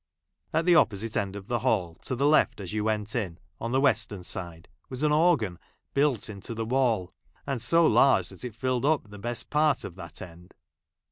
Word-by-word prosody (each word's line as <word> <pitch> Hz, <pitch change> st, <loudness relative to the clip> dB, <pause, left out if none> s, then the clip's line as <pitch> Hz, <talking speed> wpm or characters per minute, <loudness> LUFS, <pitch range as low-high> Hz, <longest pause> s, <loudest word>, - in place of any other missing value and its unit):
At 160 Hz, +1 st, +1 dB
the 180 Hz, -, +5 dB
opposite 110 Hz, -, +2 dB
end 100 Hz, 0 st, -1 dB
of 100 Hz, -1 st, -8 dB
the 120 Hz, +3 st, -1 dB
hall, 105 Hz, -8 st, 0 dB
to 130 Hz, -, -2 dB
the 140 Hz, +3 st, 0 dB
left 150 Hz, -5 st, +3 dB
as 95 Hz, -1 st, -6 dB
you 105 Hz, -1 st, -1 dB
went 110 Hz, -1 st, -1 dB
in 95 Hz, -9 st, -2 dB
— -, -, -38 dB
on 115 Hz, -, -3 dB
the 130 Hz, -, +2 dB
western 110 Hz, -8 st, +1 dB
side 85 Hz, -2 st, -6 dB
— -, -, -45 dB
was 130 Hz, +2 st, -5 dB
an 150 Hz, -, +3 dB
organ 150 Hz, -, +2 dB, 0.3 s
built 140 Hz, -5 st, +1 dB
into 110 Hz, +2 st, -6 dB
the 115 Hz, 0 st, -3 dB
wall, 115 Hz, -7 st, +1 dB, 0.3 s
and 135 Hz, -4 st, -2 dB
so 165 Hz, +8 st, +4 dB
large 135 Hz, -3 st, +4 dB
that -, -, -9 dB
it 120 Hz, -4 st, -6 dB
filled 130 Hz, 0 st, -1 dB
up 145 Hz, -7 st, +1 dB
the 105 Hz, -, -10 dB
best 120 Hz, +3 st, -4 dB
part 150 Hz, -2 st, +2 dB
of 95 Hz, -, -7 dB
that 85 Hz, -4 st, -10 dB
end. 90 Hz, 0 st, -12 dB
115 Hz, 215 wpm, -27 LUFS, 100-135 Hz, 0.3 s, the